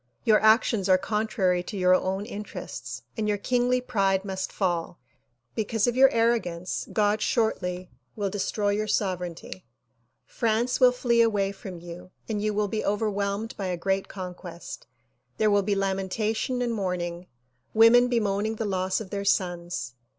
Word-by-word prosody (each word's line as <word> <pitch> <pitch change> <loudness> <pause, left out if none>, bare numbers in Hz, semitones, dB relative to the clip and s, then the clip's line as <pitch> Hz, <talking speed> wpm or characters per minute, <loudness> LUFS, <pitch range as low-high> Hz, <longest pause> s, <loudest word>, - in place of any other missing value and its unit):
Your 220 -3 +5
actions 220 -2 +3
are 185 - +7
contrary 195 -2 0
to 200 +3 -7
your 180 -1 +4
own 190 +2 0
interests 210 -2 -7
and 220 -2 -1
your 210 -1 +1
kingly 250 +3 +1
pride 195 -6 0
must 190 -1 -3
fall. 175 -3 -2 0.5
Because 220 -1 0
of 245 - 0
your 265 +1 +7
arrogance 225 -8 0
God 210 0 +2
shortly 185 - -1 0.2
will 205 -2 -1
destroy 205 +1 -1
your 210 +1 0
sovereignty. 180 -3 -3 0.6
France 235 +1 0
will 250 -1 +7
flee 240 -1 +2
away 205 -4 +2
from 195 -2 -9
you 175 +1 -10 0.2
and 210 -2 -2
you 215 0 0
will 210 0 0
be 215 +2 -2
overwhelmed 205 +1 -1
by 195 - -3
a 180 -1 -2
great 195 +2 -1
conquest. 180 -2 -8 0.5
There 215 -1 +3
will 205 0 +4
be 200 +1 0
lamentation 200 +5 -1
and 240 -1 -1
mourning, 180 -3 -3 0.5
women 230 +2 +7
bemoaning 215 -2 0
the 220 - -3
loss 190 0 -1
of 195 - -9
their 200 0 -2
sons." 175 -10 -1
205 Hz, 155 wpm, -26 LUFS, 185-220 Hz, 0.6 s, are